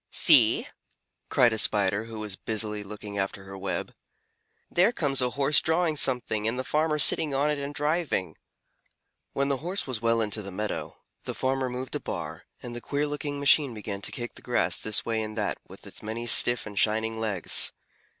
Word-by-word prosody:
"See!" - - +5 0.6
cried 120 -2 +4
a 110 - 0
Spider 100 +1 +2
who 115 -1 -8
was 105 -3 -4
busily 105 0 -2
looking 105 0 -7
after 95 0 -3
her 95 0 -9
web, 95 -2 -4 0.7
"there 185 +6 +3
comes 140 - 0
a 125 - +1
Horse 140 +3 +2
drawing 160 0 +1
something, 120 -6 +1
and 115 +2 -1
the 130 - -2
farmer 155 +2 0
sitting 150 -1 +3
on 145 +2 +1
it 150 - -2
and 140 0 -5
driving." 150 - -1 1.0
When 140 0 0
the 140 - +1
Horse 180 +7 -2
was 125 -5 -3
well 115 0 +2
into 105 -1 0
the 100 - -7
meadow, 105 +3 -5 0.3
the - - -5
farmer 130 0 -1
moved 125 +1 -6
a - - -2
bar, - - -6 0.2
and 120 -1 -7
the 120 - -6
queer 145 +4 -1
looking 145 -1 -4
machine 140 -3 +4
began 100 -2 -6
to - - 0
kick 120 0 -6
the - - -13
grass - - 0
this 110 -1 -1
way 115 -1 -1
and 110 0 -6
that 105 -2 -2
with - - -14
its - - -9
many 110 +2 -5
stiff 120 +1 +6
and 105 -2 -4
shining 110 +1 +1
legs. 105 -6 +2
115 Hz, 195 wpm, -27 LUFS, 105-140 Hz, 1.0 s, stiff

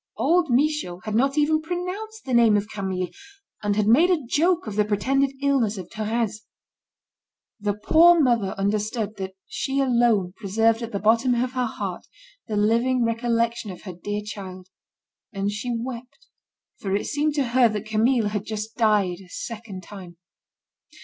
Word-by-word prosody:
Old 345 -2 +2
Michaud 255 - 0
had 215 - -4
not 270 +6 +2
even 310 +1 +3
pronounced 365 +7 -5
the 260 - -3
name 230 -3 +5
of 205 0 -2
Camille, 190 -3 -3 0.5
and 205 -1 0
had 210 0 +1
made 275 - +5
a 330 -7 +1
joke 340 +7 +2
of 215 -3 -5
the 210 - +3
pretended 265 +7 +1
illness 250 -7 +2
of 180 -2 -7
Thérèse. 220 0 -2 1.2
The 205 -1 -1
poor 335 +10 +5
mother 235 -9 +2
understood 210 +1 -1
that 190 -1 -6
she 270 0 -2
alone 235 -8 +2
preserved 225 +3 +1
at 230 0 -5
the 200 - -2
bottom 230 +4 +3
of 250 +1 0
her 255 -2 -1
heart, - - -5 0.4
the 215 -3 -2
living 235 +4 +2
recollection 230 -1 0
of 185 - -9
her 185 - -7
dear 205 +4 -4
child, 185 -3 -8 0.6
and 200 -1 -2
she 210 +4 -4
wept, 250 - -8 0.5
for 195 -1 -1
it 205 - -1
seemed 295 +1 0
to 275 -5 0
her 245 -1 +4
that 210 0 -4
Camille 220 +1 +2
had 210 -1 -3
just 220 +1 -5
died 205 -6 +2
a 180 - -18
second 215 -3 -7
time. 180 -3 -11
225 Hz, 165 wpm, -24 LUFS, 205-260 Hz, 1.2 s, name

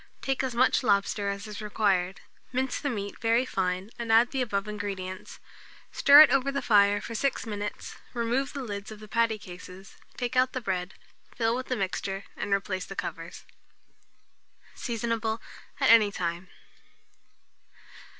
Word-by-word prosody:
Take 270 -1 0
as 260 -3 -3
much 255 +2 +3
lobster 200 -2 +1
as 200 +1 -4
is 210 0 -7
required, 195 -3 0 0.3
mince 260 0 -1
the 285 - -2
meat 200 -5 -5
very 230 +2 +2
fine, 185 -1 -2
and 230 -1 -2
add 230 +2 +5
the 270 - -1
above 200 -4 -1
ingredients; 195 -3 -6 0.5
stir 285 +1 +8
it 310 - +8
over 275 0 +2
the 280 - -3
fire 205 -2 +4
for 230 - -7
6 270 +4 -1
minutes; 205 -2 -5 0.2
remove 240 +4 -1
the 275 - -4
lids 205 -3 -6
of 215 - -9
the 215 - -11
patty 230 0 +1
cases, 185 0 -12 0.2
take 245 +1 -3
out 255 0 +3
the 255 - -2
bread, 185 -5 -3 0.4
fill 230 -1 +1
with 255 +1 -4
the 255 - -1
mixture, 195 -1 -3
and - - -4
replace 195 -1 -1
the 195 - -8
covers. 165 -2 -6 1.3
Seasonable 230 -1 -2 0.4
at - - +5
any 215 -3 +6
time. 175 -1 -3
215 Hz, 160 wpm, -28 LUFS, 195-240 Hz, 1.3 s, stir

